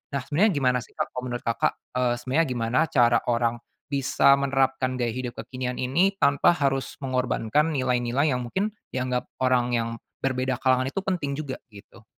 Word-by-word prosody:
nah 140 - 0
sebenarnya 180 +11 +2
gimana 125 -3 +2
sih 125 - -13
Kak - - -2
kalau 125 - -5
menurut 120 -1 -4
Kakak? 115 - +1 0.2
Eee, 125 -1 +1
sebenarnya 130 +7 0
gimana 120 0 0
cara 120 -1 +4
orang 120 0 +1 0.3
bisa 140 0 +3
menerapkan 135 -1 +1
gaya 120 -2 -1
hidup 125 0 -5
kekinian 125 -1 -4
ini 170 +12 +1
tanpa 145 0 +3
harus 135 -3 -1
mengorbankan 130 +4 0
nilai-nilai 130 +2 +1
yang 125 - -1
mungkin 200 - -1 0.2
dianggap 125 -1 -1 0.2
orang 125 -1 +2
yang 115 0 0 0.3
berbeda 130 -1 0
kalangan 130 0 +3
itu 190 +8 -3
penting 175 -7 -2
juga 140 -3 -5
gitu? 110 +1 -16
130 Hz, 165 wpm, -25 LUFS, 125-140 Hz, 0.3 s, cara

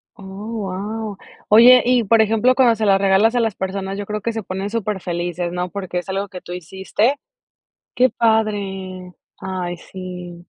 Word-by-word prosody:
Oh, 195 +3 -9
guau. 210 +1 -4 0.3
Oye, 245 +4 +8
y, 250 -1 +3
por 225 +2 +4
ejemplo, 225 +4 +3
cuando 245 -3 +4
se 220 0 -1
las 195 -1 +4
regalas 200 +4 +3
a - - +3
las 225 -4 0
personas, 190 +1 -4
yo 205 - -4
creo 210 +1 -4
que 230 +3 -2
se 225 -1 -4
ponen 190 +2 -4
superfelices, 175 -5 -3
¿no? 180 +1 -3
Porque 185 -2 -4
es 180 - -9
algo 195 +1 -2
que 185 -2 -9
tú 175 - -8
hiciste. 190 - -1 0.8
Qué 255 -1 +4
padre. 195 -5 -1 0.3
Ay, 180 -2 -4
sí. 180 -1 -9
195 Hz, 170 wpm, -20 LUFS, 185-220 Hz, 0.8 s, Oye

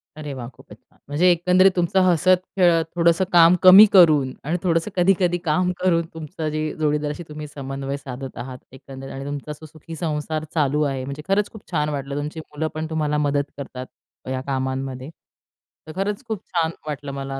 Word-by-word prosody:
अरे 150 -2 -6
वाह! 125 -3 -7
खूपच - - -16
छान. - - -33
म्हणजे 160 +6 +3
एकंदरीत 180 +2 +4
तुमचं 175 +1 +1
हसत-खेळत, 180 -1 +3
थोडंसं 170 +1 +3
काम 170 0 +7
कमी 190 +3 +10
करून 155 -8 +5
आणि 160 +5 -1
थोडंसं 170 +2 0
कधी-कधी 180 -1 +2
काम 180 +4 +1
करून, 170 -2 +2
तुमचं 160 0 -5
जे 155 0 -3
जोडीदाराशी 150 +1 -1
तुम्ही 150 0 -7
समन्वय 135 -1 -5
साधत 135 -1 -8
आहात, 130 0 -7
एकंदरीत 135 0 -10
आणि 135 +1 -7
तुमचा 145 +1 -5
जो - - -9
सुखी 155 +1 -11
संसार 155 -1 -3
चालू 150 -2 +1
आहे. 135 -3 -2
म्हणजे 140 +2 -6
खरंच 200 +1 +1
खूप 215 -4 -14
छान 150 -3 0
वाटलं. 140 -1 -4
तुमची 150 +2 -5
मुलं 155 0 -4
पण 155 0 -3
तुम्हाला 150 -2 -1
मदत 145 -1 0
करतात 130 -2 -7 0.4
या 130 0 -2
कामांमध्ये. 130 0 -3 0.8
तर - - -7
खरंच 200 +5 -2
खूप 220 -4 -4
छान 165 -2 -1 0.2
वाटलं 145 -1 -5
मला 135 0 -5
155 Hz, 175 wpm, -22 LUFS, 140-175 Hz, 0.8 s, कमी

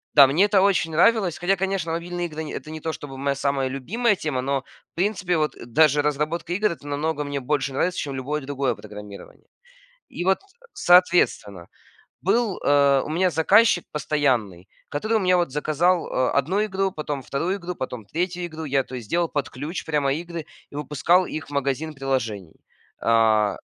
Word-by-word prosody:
Да, 140 -2 +9
мне 165 +9 +3
это 205 -2 +3
очень 190 -4 +2
нравилось. 190 +1 +3
Хотя, 190 +3 +2
конечно, 190 -3 -2
мобильные 175 +1 -3
игры- 160 0 -6
это 155 - -7
не 155 - -6
то 160 +1 -3
чтобы 135 -3 -8
моя 140 0 -1
самая 140 -1 0
любимая 205 - 0
тема, 150 -8 -2
но, 135 +1 -1 0.3
в - - -68
принципе, 185 -2 0
вот, 155 -1 0
даже 145 +4 +4
разработка 150 +4 -1
игр- 210 0 +1
это 145 -2 -9
намного 150 +1 -1
мне 145 -1 -3
больше 135 0 -1
нравится, 180 +6 0
чем 140 - -3
любое 140 +3 -3
другое 135 -3 -1
программирование. 105 -1 -11 0.6
И 175 - -5
вот, 190 +1 +3 0.3
соответственно, 170 - +3 0.5
был, 210 +1 +1
э, 140 -1 +4
у - - -7
меня 180 +3 +2
заказчик 185 +4 +4
постоянный, 125 - -1 0.2
который, 215 +10 -2
вот, 220 - +4
у 195 - -2
меня 180 0 +4
вот 170 -6 0
заказал, 160 +5 +1
а, 130 - 0
одну 175 +10 +1
игру, 195 -1 -1
потом 150 -4 -4
вторую 170 +10 -2
игру, 180 -1 -6
потом 125 -6 -6
третью 175 - -2
игру. 160 -1 -7
Я, 140 -2 +1
то 130 - -9
есть, 115 -4 -8
делал 170 0 +1
под 140 -4 -2
ключ 150 +8 -6
прямо 145 -3 +1
игры 170 +1 -5 0.3
и - - -12
выпускал 150 +5 +2
их 155 - -6
в - - -14
магазин 140 +3 -1
приложений. 115 - -3 0.5
А. 110 -3 +3
150 Hz, 180 wpm, -23 LUFS, 135-175 Hz, 0.6 s, Да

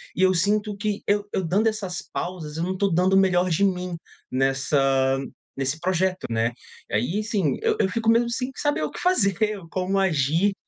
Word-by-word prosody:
e 185 - -2
eu 185 0 +5
sinto 205 +4 +1
que 210 -1 -2
eu 205 0 +1
eu 190 - 0
dando 200 +7 +2
essas 200 -5 -2
pausas, 170 -4 -4
eu 165 - -2
não 185 - -1
estou 195 -2 0
dando 185 +3 +3
o - - +6
melhor 185 -1 +3
de 185 +5 +2
mim 180 -2 -2 0.3
nessa 135 0 +2 0.4
nesse 135 +3 -1
projeto, 185 +1 0
né? 115 +1 0 0.4
Aí, 175 - 0
assim, 200 - 0
eu - - +2
eu 190 - +2
fico 225 +3 0
mesmo 235 +1 +4
sem 250 +2 -2
saber 290 - 0
o 150 - -2
que - - -8
fazer, 215 - +2 0.3
como 190 +2 -1
agir. 170 +2 +2
185 Hz, 190 wpm, -24 LUFS, 155-205 Hz, 0.4 s, o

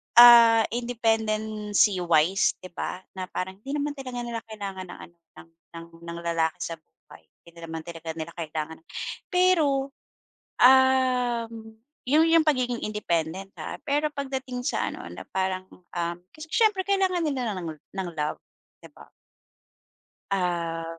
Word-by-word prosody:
ah, 235 -1 +9
independency 220 -4 +1
wise, 175 +2 +3
'di 185 - -10
ba, 180 +1 -5
na 185 -1 -4
parang 190 +1 -5
hindi 270 +6 -6
naman 295 0 -1
talaga 255 -2 -5
nila 235 -1 -4
kailangan 200 -4 -6
ng 175 - -10
ano 170 - -31 0.2
ng 165 - -15 0.6
ng 170 0 -6
lalaki 165 -1 0
sa 165 - -3
buhay - - -20 0.2
hindi 170 0 -17
naman 165 0 -5
talaga 165 -1 -7
nila 160 +1 -6
kailangan. 160 -1 -4 0.5
Pero, 320 -7 +3 0.7
uhm, 245 -4 +3 0.3
yung 305 +3 +5
yung 330 0 +5
pagiging 250 -5 +1
independent 190 -2 -2
ha 155 - -5
pero 295 +1 +1
pagdating 265 -3 -4
sa - - 0
ano - - -8
na - - -8
parang, 185 0 -2
uhm 175 -1 -5 0.2
kasi 310 +1 -10
siyempre 425 0 +3
kailangan 380 -2 +2
nila 260 -7 -1
ng 170 - -5
la - - -24 0.3
ng 175 - -5
love, 150 0 -2 0.4
'di - - -13
ba? - - -14 1.2
Ah, 170 -3 -1
220 Hz, 140 wpm, -26 LUFS, 175-260 Hz, 1.2 s, ah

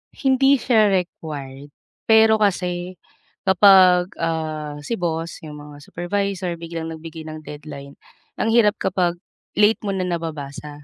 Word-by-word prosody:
Hindi 270 0 +3
siya 225 -4 +3
required, 150 -7 -4 0.4
pero 220 0 +5
kasi 180 -3 -1 0.5
kapag, 190 -1 +6
ah, 155 -2 -3
si 150 +11 -3
boss, 165 -2 -3
'yung 150 -1 -8
mga 145 -1 -12
supervisor 185 0 -3
biglang 165 -1 -6
nagbigay 160 0 -9
ng 155 0 -8
deadline, 145 -2 -10 0.4
ang - - 0
hirap 225 -2 +4
kapag 180 -2 0 0.4
late 210 +1 +4
mo 200 - -1
na 190 -1 -2
nababasa. 150 -3 -6
175 Hz, 125 wpm, -21 LUFS, 155-200 Hz, 0.5 s, kapag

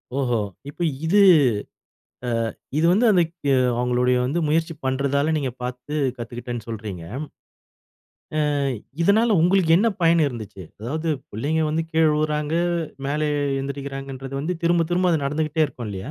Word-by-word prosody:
ஓஹோ! 125 -4 +1 0.3
இப்ப 160 - -10 0.2
இது 200 +5 +4 1.1
அ - - -2 0.5
இது 160 - +2
வந்து 215 +7 +4
அந்த 180 -3 +5 0.6
அவங்களுடைய 125 0 +2
வந்து 145 +7 -1
முயற்சி 160 +2 +1
பண்றதால 140 +3 +1
நீங்க 140 -4 -1
பாத்து 125 +4 -5 0.2
கத்துக்கிட்டேன்னு 120 -1 -6
சொல்றீங்க. 105 -6 -6 1.5
ஆ, - - 0 0.4
இதனால, 220 +6 +4
உங்களுக்கு 180 -2 +3
என்ன 225 +5 +3
பயன் 165 0 +5
இருந்துச்சு. 110 -7 -6 0.2
அதாவது 155 +9 -3 0.2
பிள்ளைங்க 145 +10 -1
வந்து 160 +1 0
கீழ 160 -1 +3
உழுறாங்க, 150 0 -1 0.5
மேல 150 +2 -1 0.4
எழுந்திரிக்குறங்கன்றது 135 -1 -5
வந்து 165 +5 -2
திரும்ப, 170 0 +3
திரும்ப 180 0 +2
அது 150 -4 0
நடந்துகிட்டே 155 +2 +1
இருக்கும் 125 -4 -8
இல்லயா. 95 -1 -6
145 Hz, 130 wpm, -23 LUFS, 125-165 Hz, 1.5 s, அந்த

